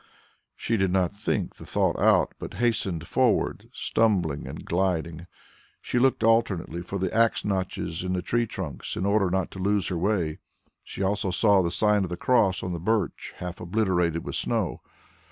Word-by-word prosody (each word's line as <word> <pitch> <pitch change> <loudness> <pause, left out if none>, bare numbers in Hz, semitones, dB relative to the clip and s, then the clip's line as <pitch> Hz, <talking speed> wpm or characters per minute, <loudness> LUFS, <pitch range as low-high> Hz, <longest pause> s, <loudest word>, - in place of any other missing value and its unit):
She 115 - -1
did 95 -1 +2
not 90 0 +1
think 105 +2 -2
the - - -11
thought - - +1
out, - - +4
but - - -7
hastened 100 -8 0
forward, 125 +5 +1
stumbling 90 -10 0
and - - -8
gliding. 85 -2 -1 0.5
She 125 - -1
looked 130 -2 +2
attentively 105 -7 +1
for 95 +3 -5
the 95 -1 -2
axe 115 0 +2
notches 95 -4 -2
in 90 0 -2
the 90 -1 -2
tree 120 +4 0
trunks 90 -8 -5
in 95 - -1
order 100 -2 +2
not 95 0 -1
to 95 - -9
lose 100 0 +1
her 90 - -2
way. 90 -5 0 0.4
She - - -5
also 100 0 0
saw 100 +2 +4
the 85 - 0
sign 105 +2 +2
of 90 - -3
the 90 - -4
cross 115 -8 +2
on 90 - -3
the 85 - -4
birch 105 +2 -1
half 90 -1 -6
obliterated 90 -4 0
with - - -5
snow. - - -1
95 Hz, 180 wpm, -26 LUFS, 90-105 Hz, 0.5 s, out